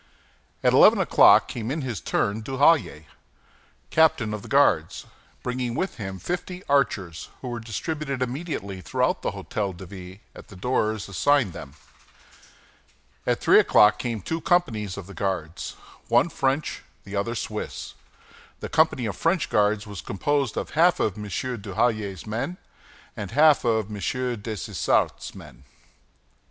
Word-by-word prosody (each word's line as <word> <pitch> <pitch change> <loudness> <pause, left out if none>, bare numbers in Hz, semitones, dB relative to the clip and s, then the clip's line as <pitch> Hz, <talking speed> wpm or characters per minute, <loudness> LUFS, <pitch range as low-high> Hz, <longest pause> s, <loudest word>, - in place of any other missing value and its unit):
At - - +4
eleven - - +7
o'clock - - +6
came 115 -1 -5
in 150 +2 -2
his 120 -8 -4
turn 100 +2 -1
Duhallier, 130 - +2 0.9
captain 135 -9 +3
of 105 - -4
the - - -11
Guards, 95 - +2 0.4
bringing 125 -1 -2
with 190 - -2
him 95 -4 -5
fifty 180 - -5
archers, 100 - 0
who 125 - -5
were 120 -1 -4
distributed 140 +5 -4
immediately 125 - -4
through - - 0
the - - -2
Hôtel 100 -4 -4
de 95 - -9
Ville, 95 0 -10 0.2
at - - -12
the 100 - -13
doors 110 0 -1
assigned 120 +1 +2
them. 70 +1 -10 1.5
At - - +1
three - - +6
o'clock 105 0 +5
came 115 -5 -3
two 165 0 -3
companies 125 - 0
of 100 - -7
the 100 - -11
Guards, 90 -5 -3 0.3
one - - +3
French, 135 0 -1 0.2
the 100 - -8
other 100 +4 -1
Swiss. - - -5 0.7
The - - -6
company 155 -6 +2
of 105 -4 -3
French 165 - 0
guards 105 0 +2
was 100 -3 -7
composed 140 +4 -1
of - - -3
half 170 +3 +4
of 105 - 0
M. 105 -1 -7
Duhallier's 105 -2 -2
men 125 +12 -3 0.6
and 100 - -5
half 150 +5 +5
of 110 -3 0
M. 105 - -5 0.4
Dessessart's 105 -3 -1
men. - - -13
110 Hz, 145 wpm, -25 LUFS, 100-140 Hz, 1.5 s, eleven